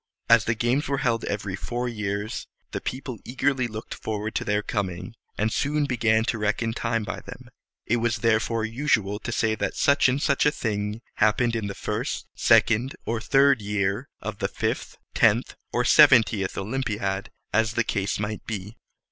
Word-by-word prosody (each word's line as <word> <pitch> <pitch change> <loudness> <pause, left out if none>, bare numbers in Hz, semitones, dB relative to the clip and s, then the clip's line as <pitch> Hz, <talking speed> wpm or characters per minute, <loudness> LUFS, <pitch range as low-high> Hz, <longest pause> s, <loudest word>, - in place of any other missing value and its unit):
As 115 -1 +6
the 115 - +1
games 120 +6 0
were 140 - 0
held 115 -2 +1
every 100 -2 -3
four 120 +5 -3
years, 105 -2 -3 0.2
the - - -4
people 130 -2 -5
eagerly 130 0 0
looked 110 0 -7
forward 110 0 -4
to - - -1
their 105 0 0
coming, 95 -3 -3 0.2
and 110 +1 0
soon 145 +1 +1
began 115 -4 +2
to 115 -1 -1
reckon 110 +2 0
time 115 -1 -1
by - - -5
them. - - -11 0.4
It 120 - +1
was 115 0 0
therefore 115 0 +2
usual 110 -4 0
to 120 - -5
say 110 -1 +1
that 110 - -2
such 140 -2 +4
and 130 +3 0
such 145 0 +2
a - - +4
thing 105 -3 -3 0.2
happened 115 +2 +2
in 110 -2 -2
the 100 - -5
first, - - -3
second, 120 +4 +3
or 115 -1 -2
third 135 -1 +4
year 100 +4 -1
of - - -5
the - - 0
fifth, - - -3 0.2
tenth, - - +3 0.2
or - - 0
seventieth 105 -4 +5
O 95 - -2
lym´pi 115 -2 -2
ad, 95 0 -2 0.2
as 110 0 +2
the 120 - +2
case 100 -2 -1
might 105 +1 -4
be. 105 0 -5
110 Hz, 180 wpm, -25 LUFS, 105-120 Hz, 0.4 s, As